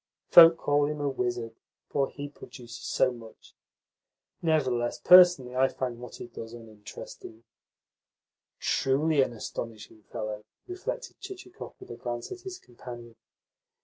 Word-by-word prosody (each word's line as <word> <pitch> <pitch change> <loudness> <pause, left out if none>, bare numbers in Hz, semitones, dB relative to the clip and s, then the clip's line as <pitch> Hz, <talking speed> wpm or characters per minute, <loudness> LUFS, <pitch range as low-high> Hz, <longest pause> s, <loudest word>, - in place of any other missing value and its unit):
Folk 165 -1 +10
call 145 -2 +2
him 150 0 -4
a 145 - -1
wizard, 120 -4 -2 0.4
for 135 -1 +1
he 145 0 -7
produces 125 -4 -12
so 130 - +1
much. 115 -2 -13 0.9
Nevertheless, 130 -7 +1
personally 175 -9 +7
I 130 +1 +4
find 125 -3 -4
what 125 - -9
he - - -8
does 115 -1 -9
uninteresting." 110 0 -11 1.2
"Truly 145 +2 +2
an 130 - +1
astonishing 110 -1 -7
fellow!" 105 -1 -5 0.2
reflected 365 0 -6
Chichikov 370 -1 -10
with 385 - -11
a - - -7
glance 120 -1 -5
at 370 - -7
his 375 -1 -7
companion. 120 -1 -11
125 Hz, 130 wpm, -28 LUFS, 120-150 Hz, 1.2 s, Folk